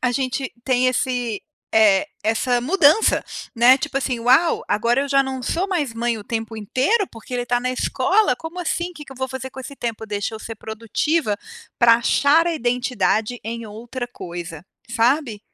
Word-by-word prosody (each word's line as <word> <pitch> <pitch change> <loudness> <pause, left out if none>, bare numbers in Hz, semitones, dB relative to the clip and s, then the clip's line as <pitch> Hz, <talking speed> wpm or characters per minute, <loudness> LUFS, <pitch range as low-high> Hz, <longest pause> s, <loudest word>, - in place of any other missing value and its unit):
a 250 - +1
gente 260 +1 -2
tem 255 -1 +2
esse, 250 -4 -1 0.3
eh, 215 0 +5 0.2
essa 235 +3 +1
mudança, 320 - +4 0.3
né, 245 +2 +6
tipo 275 0 -2
assim: 255 -3 -2
"Uau! 260 +8 +3
Agora 235 +5 +1
eu 280 - -4
já 275 0 +4
não 265 -1 -5
sou 350 +10 -1
mais 310 -10 -1
mãe 235 0 -1
o 210 - -9
tempo 225 0 -4
inteiro, 260 - +1
porque 230 +2 -9
ele 245 - 0
está 245 0 0
na 255 +1 -1
escola. 310 +7 +2
Como 325 +5 -8
assim? 350 +1 -2
Que 300 -2 -10
que 270 - -11
eu - - -15
vou 260 0 -3
fazer 265 0 -6
com 265 - -9
esse 275 +2 -9
tempo? 225 -3 -4
Deixa 205 +1 -3
eu - - -6
ser 225 +1 -7
produtiva 225 +3 -1 0.4
pra 230 -1 +7
achar 285 +7 +3
a 340 - 0
identidade 245 -3 0
em 230 +1 -5
outra 235 +4 -6
coisa." 170 -7 -8 0.3
Sabe? 235 0 +1
245 Hz, 185 wpm, -21 LUFS, 225-275 Hz, 0.4 s, pra